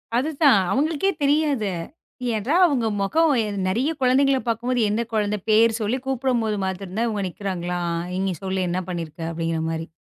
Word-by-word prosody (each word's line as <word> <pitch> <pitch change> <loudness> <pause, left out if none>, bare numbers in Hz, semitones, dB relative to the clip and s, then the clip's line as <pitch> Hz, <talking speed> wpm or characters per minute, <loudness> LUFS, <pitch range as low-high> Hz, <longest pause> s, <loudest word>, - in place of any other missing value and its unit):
அது 260 +6 +1
தான் 260 -9 +7
அவங்களுக்கே 315 +7 +1
தெரியாது. 280 -8 +2 0.6
ஏனா 220 +8 -1
அவங்க 270 -9 +1 0.2
முகம் 310 +9 +3 0.3
நெறைய 235 +10 +1
குழந்தைகளப் 265 +1 +3
பாக்கும்போது 240 +2 0
எந்த 215 +3 0
குழந்தை 210 -1 0
பேர் 225 +1 +4
சொல்லி 235 +5 0
கூப்பிடும்போது 240 -5 0
மாத்திரந்தான் 190 +4 -2
இவங்க 205 -2 -2
நிக்கறாங்களா? 180 -2 -4 0.3
நீங்கச் 185 -3 -2
சொல்லு 190 0 -1
என்ன 185 +1 -1
பண்ணி 170 -2 -3
இருக்க? 155 +2 -13
அப்படீங்கற 165 -1 -2
மாதிரி. 165 0 -4
220 Hz, 150 wpm, -23 LUFS, 190-260 Hz, 0.6 s, தான்